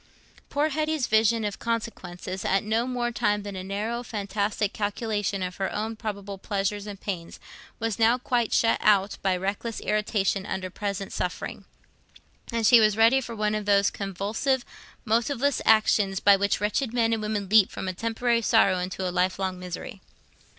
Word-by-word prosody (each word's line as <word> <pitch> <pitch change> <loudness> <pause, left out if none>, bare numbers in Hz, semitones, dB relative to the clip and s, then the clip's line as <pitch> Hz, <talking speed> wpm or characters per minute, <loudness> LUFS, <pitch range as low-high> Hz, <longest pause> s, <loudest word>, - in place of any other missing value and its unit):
Poor 295 +2 +1
Hetty's 310 -2 0
vision 220 0 +3
of 205 -1 -4
consequences, 190 -5 -4
at 195 0 +1
no 220 +3 0 0.3
time 210 -2 +1
more 205 - -6
than 200 -1 -6
a 185 - -5
narrow 210 +5 -3
fantastic 210 -2 -2
calculation 205 -2 -2
of 180 0 -5
her 195 - -2
own 220 +2 -3
probable 200 -3 -6
pleasures 200 +1 -2
and 200 -2 -7
pains, 180 -5 -5 0.4
was 225 -2 -2
now 230 +2 +4
quite 240 -2 0
shut 225 - +3
out 200 -1 +3
by 190 -2 +1
reckless 200 +5 -3
irritation 210 -2 0
under 190 -1 -4
present 200 0 -4
suffering, 180 0 -4 0.9
and 230 -1 0
she 240 +1 +8
was 215 -1 +3
ready 230 +4 +5
for 235 -2 -7
one 210 -1 0
of 215 -1 -2
those 200 -1 +3
convulsive, 205 +7 -2 0.4
motiveless 240 +5 +1
actions 210 -3 +3
by 200 0 +6
which 200 +1 0
wretched 220 +4 -1
men 230 -1 +2
and 225 - -1
women 210 -2 -2
leap 215 0 +5
from - - -6
a 185 - -2
temporary 230 +3 0
sorrow 190 -4 +3
into 185 +1 -3
a - - -2
lifelong 185 0 0
misery. 180 +2 -7
210 Hz, 170 wpm, -26 LUFS, 195-225 Hz, 0.9 s, she